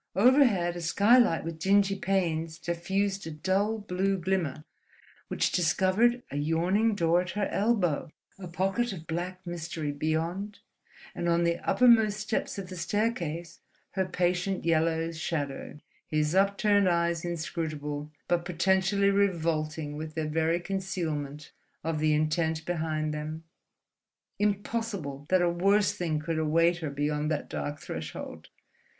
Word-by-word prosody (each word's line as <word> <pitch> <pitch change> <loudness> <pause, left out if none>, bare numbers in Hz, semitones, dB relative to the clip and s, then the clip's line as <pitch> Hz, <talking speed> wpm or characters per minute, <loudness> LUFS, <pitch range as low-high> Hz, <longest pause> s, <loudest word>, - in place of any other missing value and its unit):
Overhead 205 -6 +4
a 175 - -5
skylight 205 +2 +4
with 165 0 -6
dingy 195 +2 +3
panes 165 -5 -1
diffused 190 +3 -2
a - - -4
dull 190 +8 0
blue 195 -1 -1
glimmer 170 -5 -1 0.6
which - - 0
discovered 190 +8 +2
a 145 - -3
yawning 175 +9 +2
door 170 -1 +3
at 180 - -6
her 205 - +1
elbow, 195 -10 +1 0.3
a 185 - -7
pocket 195 +6 -1
of 165 -4 -9
black 180 +3 -4
mystery 165 -3 -4
beyond, 165 +7 -2 0.6
and 175 - -2
on 170 0 +3
the 170 0 +1
uppermost 225 -4 +5
steps 215 0 -2
of 190 -2 -6
the 185 - -7
staircase 170 -3 -2 0.3
her 190 -1 0
patient 180 +1 -1
yellow 165 0 +1
shadow, 150 -4 -4 0.3
his 155 0 0
upturned 200 0 +3
eyes 170 0 +1
inscrutable 155 -3 -4 0.2
but 175 -1 +1
potentially 190 +3 +2
revolting 160 -6 0
with 155 0 -6
their 160 -1 -1
very 160 +2 +1
concealment 160 -6 -4 0.3
of 160 -1 -1
the 155 0 +3
intent 160 +1 0
behind 155 -3 -1
them. 155 +1 -5 1.0
Impossible 200 -8 -2
that 185 -1 +4
a 175 - +3
worse 200 +3 +3
thing 175 -6 -1
could 160 +1 -2
await 165 +2 +3
her 160 -4 -4
beyond 150 +1 -1
that 155 -2 -2
dark 145 0 -4
threshold.... 80 -1 -7
175 Hz, 135 wpm, -28 LUFS, 160-195 Hz, 1.0 s, uppermost